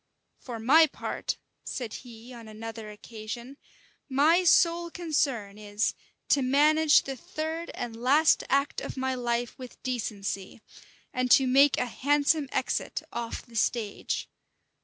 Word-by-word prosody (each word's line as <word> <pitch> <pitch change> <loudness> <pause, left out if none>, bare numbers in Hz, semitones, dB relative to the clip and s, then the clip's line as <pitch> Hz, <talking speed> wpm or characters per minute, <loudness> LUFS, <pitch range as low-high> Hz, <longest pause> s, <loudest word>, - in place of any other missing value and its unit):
"For 240 -3 -7
my 310 +8 +6
part," - - -4 0.3
said 240 -4 -5
he, 240 0 -10
on 230 -2 -11
another 220 0 -8
occasion 225 +5 -8 0.5
"my 310 +7 +4
sole 340 0 +4
concern 275 - -1
is, 210 +1 -1 0.4
to 280 - +4
manage 300 +4 +4
the 270 - -5
third 320 +6 -5
and 230 -2 -5
last 275 +7 +4
act 280 +1 +1
of - - -6
my 260 0 -1
life 240 -1 -2
with 255 -1 -10
decency, 205 -5 -4 0.5
and 255 0 0
to 265 - +6
make 275 +2 +5
a - - +1
handsome 285 +3 +1
exit 260 - -2
off 235 -1 -5
the 235 - -16
stage. 220 -1 -1
255 Hz, 135 wpm, -28 LUFS, 230-290 Hz, 0.5 s, my